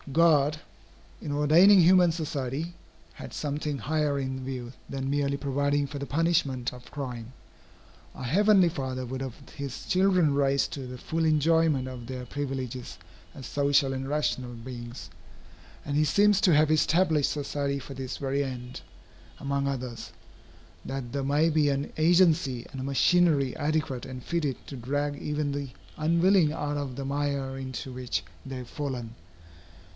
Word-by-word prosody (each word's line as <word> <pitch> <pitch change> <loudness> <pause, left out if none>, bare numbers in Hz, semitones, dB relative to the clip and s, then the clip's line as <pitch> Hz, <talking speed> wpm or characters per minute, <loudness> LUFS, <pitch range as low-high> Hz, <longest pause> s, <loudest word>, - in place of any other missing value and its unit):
God, 155 -1 +4 0.6
in 145 - -4
ordaining 160 +8 +6
human 180 0 +6
society, 155 0 -3 0.4
had - - -10
something 145 0 -2
higher 150 0 0
in 130 -1 -3
view 130 -2 -5 0.2
than 135 0 -3
merely 140 -1 0
providing 140 +1 0
for 140 +1 -6
the 140 - -5
punishment 145 -6 +1
of 125 -1 -12
crime. 125 -4 -6 0.8
Our - - -8
Heavenly 195 - +5
Father 130 -5 -3
would 130 +2 -5
have 130 -3 -5 0.2
his 140 -2 -6
children 185 -5 +3
raised 140 -1 +1
to 135 -3 -5
the 125 0 -7
full 165 +5 -2
enjoyment 155 -3 +3
of 125 -2 -8
their 125 -1 -5
privileges 130 -6 -5 0.4
as 135 - -9
social 140 0 +2
and 135 +1 -4
rational 130 -4 -1
beings, 120 -7 -8 0.7
and 145 - -2
he 150 - +4
seems 200 +7 +4
to 175 -5 +5
have 155 +1 +4
established 155 -1 +3
society 140 -1 -2
for 140 0 -8
this 130 -1 -5
very 140 0 -1
end, 125 -2 -6 0.6
among 140 0 -1
others, 125 -8 -4 0.7
that 135 -2 -5
there 140 -1 -1
may 145 +4 +3
be 150 -2 +3
an 140 0 -2
agency 160 -6 +3
and 135 - -6
a - - -4
machinery 140 0 +3
adequate 145 -4 -1
and 130 -1 -8
fitted 155 -6 -1
to 140 - -7
drag 145 +4 -2
even 150 -1 -1
the 140 -1 -4 0.3
unwilling 170 +1 +3
out 145 -2 -3
of 140 -3 -4
the 135 - -5
mire 140 -1 -2
into 130 0 -6
which 125 -8 -3 0.2
they 135 -1 -6
have 125 -1 -7
fallen. 125 -6 -4
140 Hz, 155 wpm, -28 LUFS, 130-155 Hz, 0.8 s, ordaining